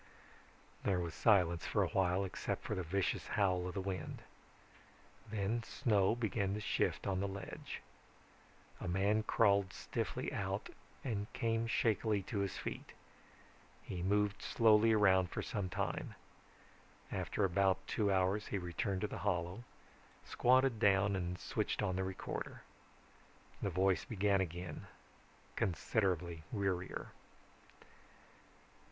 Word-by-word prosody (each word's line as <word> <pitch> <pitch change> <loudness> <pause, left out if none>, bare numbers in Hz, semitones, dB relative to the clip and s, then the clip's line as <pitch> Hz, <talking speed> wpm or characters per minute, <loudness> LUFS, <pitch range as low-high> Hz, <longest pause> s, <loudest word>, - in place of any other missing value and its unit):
There 95 -3 +1
was 85 -2 -3
silence 90 -6 +3
for - - +2
a - - -1
while 95 0 +2
except 95 - -3
for - - -3
the 95 - -1
vicious 95 +3 -1
howl 90 -3 +1
of 90 - -6
the 95 - -1
wind. 95 -1 -4 1.1
Then 110 +2 -1
snow 110 -3 +2
began 100 -4 -1
to - - -3
shift 105 - 0
on 95 -2 0
the 100 - 0
ledge. 95 0 -7 1.0
A - - -5
man 100 +4 +2
crawled 100 -3 +3
stiffly - - -3
out - - -2 0.3
and 105 -5 -3
came 115 0 0
shakily 110 -3 +1
to 105 +1 -3
his 100 -2 -1
feet. - - -6 0.9
He 90 - -5
moved 100 +2 +1
slowly 110 0 +5
around 95 -4 +4
for - - -3
some 100 -3 -2
time. - - -3 1.0
After 105 - 0
about 95 +1 +2
two 105 -2 +1
hours 95 +2 +1
he 100 - -1
returned 95 +1 -2
to 105 - 0
the - - -6
hollow, 90 +2 -1 0.6
squatted 130 -1 +3
down 100 -1 +4
and 90 -1 -2
switched - - -2
on 95 - 0
the 95 - 0
recorder. 95 0 -5 1.0
The 100 - 0
voice 95 -1 +2
began 100 -2 +2
again, 90 0 -5 0.7
considerably 90 -3 0
wearier. 95 -4 -2
100 Hz, 130 wpm, -36 LUFS, 95-105 Hz, 1.1 s, slowly